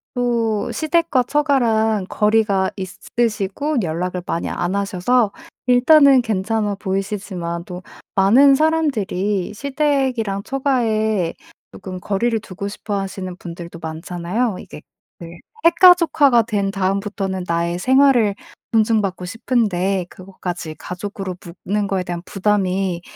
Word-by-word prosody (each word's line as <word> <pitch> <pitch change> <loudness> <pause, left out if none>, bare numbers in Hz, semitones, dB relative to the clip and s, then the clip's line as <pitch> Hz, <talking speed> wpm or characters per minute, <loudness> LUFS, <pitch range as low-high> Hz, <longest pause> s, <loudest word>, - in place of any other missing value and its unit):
또 230 -4 0
시댁과 315 -4 +1
처가랑 230 -8 +1
거리가 210 -3 +2
있으시고 215 +7 -2
연락을 180 +2 -3
많이 170 - -2
안 175 +2 -2
하셔서 200 +3 +1 0.4
일단은 270 +2 +6
괜찮아 215 -1 -1
보이시지만 190 -3 -4
또 180 -2 -8 0.3
많은 250 +9 +6
사람들이 215 - 0
시댁이랑 265 -6 -1
처가에 220 -9 0 0.4
쪼끔 185 -2 -8
거리를 225 +4 0
두고 200 -1 -7
싶어 205 +1 -5
하시는 190 -1 -5
분들도 170 -1 -9
많잖아요. 175 +7 -3
이게 - - -11 0.4
네 170 0 -10 0.3
핵가족화가 335 -8 +5
된 205 -3 -1
다음부터는 195 -1 -2
나의 170 +1 -1
생활을 255 -3 +4 0.4
존중받고 215 -5 +1
싶은데 195 -3 0
그것까지 180 -4 -7
가족으로 190 +1 -6 0.3
묶는 205 +1 0
것에 190 -2 -1
대한 175 -1 -5
부담이 190 -3 0
205 Hz, 285 characters per minute, -20 LUFS, 185-240 Hz, 0.4 s, 일단은